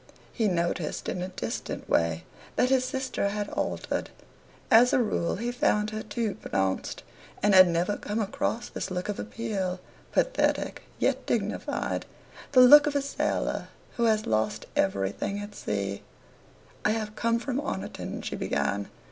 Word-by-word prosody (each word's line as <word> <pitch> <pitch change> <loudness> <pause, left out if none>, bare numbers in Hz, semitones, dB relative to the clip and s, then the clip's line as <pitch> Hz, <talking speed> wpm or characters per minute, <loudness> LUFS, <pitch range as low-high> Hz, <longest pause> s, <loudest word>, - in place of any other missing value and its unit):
He 225 -3 +1
noticed, 170 -3 -1
in 180 - -2
a 180 - -2
distant 185 - -5
way, 85 0 +1 0.3
that 255 - +2
his 260 -1 +4
sister 260 -5 -1
had 205 0 -3
altered. - - -2 0.6
As 245 +4 +7
a 275 - +5
rule 210 -7 0
he 235 +4 -2
found 210 -3 +1
her 215 0 -3
too 215 -1 -2
pronounced, 95 -1 -2 0.4
and 205 0 +4
had 185 -1 +9
never 175 +4 0
come 210 +2 -3
across 220 +2 -1
this - - -5
look 180 +1 -3
of 205 - -2
appeal, 205 -5 -3 0.3
pathetic - - +1 0.2
yet - - 0
dignified - - -1 0.5
the 255 - +8
look 290 +4 +9
of 290 - -1
a 285 - +3
sailor 280 - -1 0.3
who 235 - +2
has 215 -1 +2
lost 110 0 0
everything 100 - 0
at 205 0 -6
sea. 100 - -3 0.8
"I 215 - +3
have 215 -1 -3
come 230 +1 +1
from 255 +2 -2
Oniton," - - -5
she - - -3
began. - - -1
210 Hz, 155 wpm, -28 LUFS, 180-235 Hz, 0.8 s, had